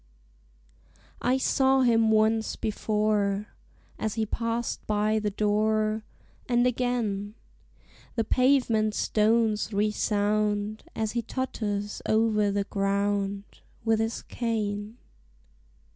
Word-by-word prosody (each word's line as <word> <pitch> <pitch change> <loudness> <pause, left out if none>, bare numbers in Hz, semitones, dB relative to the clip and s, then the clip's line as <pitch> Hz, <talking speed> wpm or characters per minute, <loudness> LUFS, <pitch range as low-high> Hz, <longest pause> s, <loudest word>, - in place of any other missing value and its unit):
I 255 +2 +2
saw 265 0 +3
him 225 -3 +4
once 220 0 +2
before, 210 -1 0 0.5
As 220 -1 -2
he 220 -1 0
passed 230 +2 -3
by 215 +1 +1
the 210 -1 -1
door; 215 +1 +1 0.5
And 240 0 +3
again 230 -5 -1 0.8
The 225 - +1
pavement 245 -5 +2
stones 220 0 +2
resound 210 0 0
As 220 -1 -1
he 240 - -1
totters 210 -4 -3
o'er 215 -2 +3
the 200 0 0
ground 200 0 -1 0.4
With 225 -1 +3
his 225 +1 -2
cane. 215 -2 -3
215 Hz, 100 wpm, -27 LUFS, 205-230 Hz, 0.8 s, him